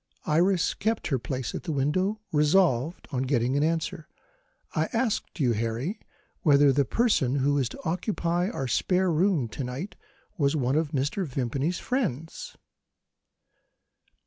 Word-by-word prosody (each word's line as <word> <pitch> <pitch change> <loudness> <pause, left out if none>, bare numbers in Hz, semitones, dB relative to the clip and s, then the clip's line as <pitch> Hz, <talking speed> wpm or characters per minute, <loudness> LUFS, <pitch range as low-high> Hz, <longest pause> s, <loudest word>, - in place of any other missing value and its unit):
Iris 175 +3 +2
kept 220 -1 -1
her 135 -4 +1
place 130 0 -4
at - - -4
the 170 - -4
window, 185 +10 0
resolved 150 -1 +2
on 130 -3 -1
getting 130 -1 +1
an 145 - +2
answer. 160 -1 -1 0.7
"I - - +1
asked 230 -6 -1
you, 130 -5 +3
Harry, 115 - -2 0.4
whether 145 -5 +5
the 140 +1 +2
person 155 - +2
who 140 +1 +2
is 130 -3 0
to - - -11
occupy 175 0 0
our 135 - -3
spare 180 +8 +1
bedroom, 165 - +2
to 135 - -5
night, 130 +11 -5 0.4
was 140 0 +2
one 130 -2 +1
of 155 -1 +1
Mr. 145 +6 -1
Vimpany's 135 +6 -1
friends?" 165 - -3
150 Hz, 145 wpm, -27 LUFS, 130-180 Hz, 0.7 s, whether